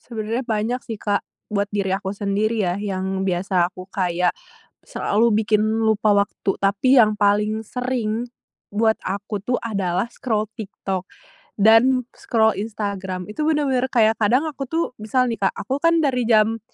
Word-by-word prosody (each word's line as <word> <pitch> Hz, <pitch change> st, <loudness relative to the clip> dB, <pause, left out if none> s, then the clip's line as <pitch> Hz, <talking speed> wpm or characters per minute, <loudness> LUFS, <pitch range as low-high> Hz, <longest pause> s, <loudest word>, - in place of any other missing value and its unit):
Sebenarnya 225 Hz, +1 st, -4 dB
banyak 225 Hz, +2 st, -1 dB
sih, 225 Hz, -2 st, -6 dB
Kak. 205 Hz, -1 st, 0 dB, 0.3 s
Buat 205 Hz, -1 st, 0 dB
diri 200 Hz, -2 st, 0 dB
aku 190 Hz, 0 st, -3 dB
sendiri, 210 Hz, +2 st, 0 dB
ya, 175 Hz, -2 st, 0 dB
yang 190 Hz, -1 st, -2 dB
biasa 180 Hz, -1 st, +1 dB
aku 185 Hz, -1 st, -10 dB
kayak, 180 Hz, -2 st, 0 dB, 0.5 s
selalu 225 Hz, +2 st, +1 dB
bikin 215 Hz, -1 st, +2 dB, 0.2 s
lupa 220 Hz, -1 st, +3 dB
waktu, 200 Hz, -1 st, 0 dB
tapi 205 Hz, +7 st, +3 dB
yang 215 Hz, -3 st, +4 dB
paling 210 Hz, +2 st, +2 dB
sering, 240 Hz, -2 st, -2 dB, 0.5 s
buat 220 Hz, +2 st, +2 dB
aku 200 Hz, +2 st, -4 dB
tuh 245 Hz, +4 st, 0 dB
adalah 195 Hz, -4 st, -1 dB
scroll 220 Hz, -4 st, -2 dB
TikTok, 195 Hz, -3 st, -4 dB, 0.6 s
dan 225 Hz, +5 st, +5 dB
scroll 220 Hz, -2 st, +1 dB
Instagram. 200 Hz, -4 st, -4 dB
Itu 300 Hz, +8 st, -2 dB
bener-bener 280 Hz, -5 st, +1 dB
kayak, 225 Hz, -2 st, +3 dB
kadang 245 Hz, +8 st, +2 dB
aku 275 Hz, -2 st, -6 dB
tuh 325 Hz, +5 st, 0 dB, 0.2 s
misal 255 Hz, +4 st, +1 dB
nih, 230 Hz, -, -3 dB
Kak. 195 Hz, -, +2 dB
Aku 270 Hz, -, -1 dB
kan 335 Hz, 0 st, +4 dB
dari 250 Hz, -4 st, +1 dB
jam 220 Hz, 0 st, +3 dB
215 Hz, 155 wpm, -22 LUFS, 200-235 Hz, 0.6 s, dan